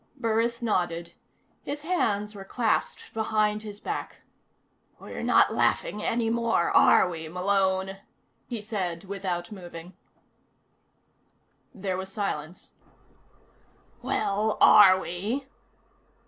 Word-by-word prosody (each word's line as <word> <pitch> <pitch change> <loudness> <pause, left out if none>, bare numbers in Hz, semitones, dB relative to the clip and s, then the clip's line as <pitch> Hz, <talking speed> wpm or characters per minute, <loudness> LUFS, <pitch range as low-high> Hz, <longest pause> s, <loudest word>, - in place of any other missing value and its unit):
Burris 235 0 0
nodded. 175 -5 -1 0.5
His 290 +1 -5
hands 210 - 0
were 200 -2 -9
clasped 225 +3 -1
behind 215 -1 0
his 210 -1 -7
back. - - -5 0.8
"We're - - -8
not - - +4
laughing 210 - 0
any 230 0 0
more, 230 -6 +1
are - - +6
we, 165 -2 -6
Malone?" 190 +1 0 0.5
he 235 -4 -4
said 185 -6 -3
without 185 -2 -4
moving. 175 -2 -10 1.8
There 190 -5 -3
was 190 0 -6
silence. 185 -5 -5 1.3
"Well, 210 +2 0
are 190 -3 +8
we?" 205 +11 -3
200 Hz, 100 wpm, -27 LUFS, 180-220 Hz, 1.8 s, are